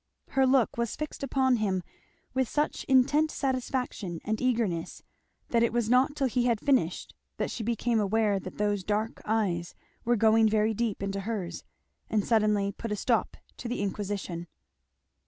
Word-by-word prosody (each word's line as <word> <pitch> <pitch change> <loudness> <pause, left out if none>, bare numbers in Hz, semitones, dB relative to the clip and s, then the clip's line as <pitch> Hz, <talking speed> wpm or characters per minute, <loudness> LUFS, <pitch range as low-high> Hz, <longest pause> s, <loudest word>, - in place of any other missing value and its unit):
Her 265 -1 +3
look 255 -3 +3
was 235 -2 -1
fixed 305 -1 -6
upon 260 -2 +2
him 190 -4 0 0.5
with 260 -3 0
such 295 0 -1
intent 285 +4 +4
satisfaction 255 - -2
and 220 +1 -1
eagerness 225 -10 -1 0.5
that 235 - +2
it 235 - +3
was 235 -1 0
not 260 +4 +4
till 280 - 0
he 250 -1 +1
had 235 -3 +2
finished 250 - +1 0.2
that - - -2
she - - -4
became 230 0 0
aware 210 -1 +2
that 185 - -9
those 205 -2 0
dark 215 +3 -2
eyes 195 -6 -1 0.3
were 240 +1 +2
going 220 0 +5
very 215 +1 +2
deep 220 -2 -2
into 195 0 -2
hers, 195 -5 -4 0.5
and 210 -2 +1
suddenly 210 -3 +2
put 225 +2 -6
a - - +1
stop 230 +2 0 0.2
to 245 - -6
the 235 -4 -2
inquisition. 195 -4 -3
225 Hz, 165 wpm, -28 LUFS, 205-250 Hz, 0.5 s, going